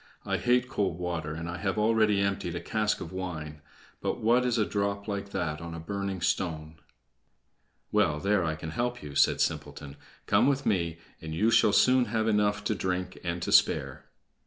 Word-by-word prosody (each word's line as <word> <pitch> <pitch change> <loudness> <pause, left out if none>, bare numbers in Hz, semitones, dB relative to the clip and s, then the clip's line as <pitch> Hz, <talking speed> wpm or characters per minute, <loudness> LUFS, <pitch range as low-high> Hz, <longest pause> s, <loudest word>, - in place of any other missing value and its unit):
I - - 0
hate 125 0 +2
cold 100 -9 -1
water, 85 -4 -3
and 80 +1 -5
I 85 0 -4
have 95 +2 -2
already 105 -2 +3
emptied 100 -3 -1
a - - -2
cask 110 +2 -1
of 80 - -6
wine; 80 -5 -5 0.4
but - - -2
what 120 +3 +3
is 120 -1 +1
a 110 - +2
drop 100 0 -2
like 100 -1 -3
that 85 -6 -3
on 85 0 -6
a - - -6
burning 100 +1 -4
stone?" 80 -2 -2 1.1
"Well, 75 0 +2
there 100 0 +2
I 80 -1 -1
can 80 0 -7
help 120 +5 -2
you," 75 -1 -8
said - - +3
Simpleton. 70 -1 -3 0.3
"Come - - +3
with 140 0 +1
me, 85 -5 0 0.2
and 80 0 -6
you 110 +7 +2
shall 110 - +5
soon 125 +3 +4
have 110 -2 -1
enough 105 -1 +1
to 105 - 0
drink 90 -2 -3
and 85 0 -3
to - - -2
spare." 70 -1 +3
95 Hz, 190 wpm, -28 LUFS, 80-105 Hz, 1.1 s, shall